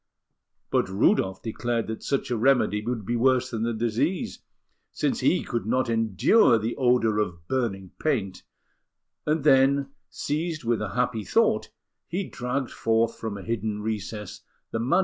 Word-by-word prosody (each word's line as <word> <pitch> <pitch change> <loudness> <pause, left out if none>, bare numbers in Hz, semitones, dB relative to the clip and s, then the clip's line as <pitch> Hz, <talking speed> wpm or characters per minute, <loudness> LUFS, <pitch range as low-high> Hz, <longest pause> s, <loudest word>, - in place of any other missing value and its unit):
But - - +2
Rudolf 95 - +2
declared 120 0 -2
that 110 0 -5
such 140 -2 -1
a - - +2
remedy 115 -3 +2
would 115 -3 -3
be 120 - -1
worse 130 +1 +2
than 115 -2 -3
the 115 +1 0
disease, 120 - -1 0.5
since - - -1
he - - +2
could 120 -2 -3
not 125 0 +1
endure 115 - +4
the 110 +2 -2
odour 120 -5 +2
of 85 -5 -3
burning 100 -8 -2
paint; 105 -12 -1 0.9
and 155 -1 +1
then, 140 -1 +4 0.2
seized 155 0 -3
with 115 -2 0
a 105 -2 -4
happy 125 -3 0
thought, - - +2 0.4
he 185 +4 -2
dragged 125 +1 -3
forth 115 0 0
from 110 -3 -4
a 100 - -8
hidden 110 -2 -2
recess 105 -1 -4 0.3
the 115 - -2
MS. 120 +3 +2
115 Hz, 155 wpm, -26 LUFS, 110-130 Hz, 0.9 s, endure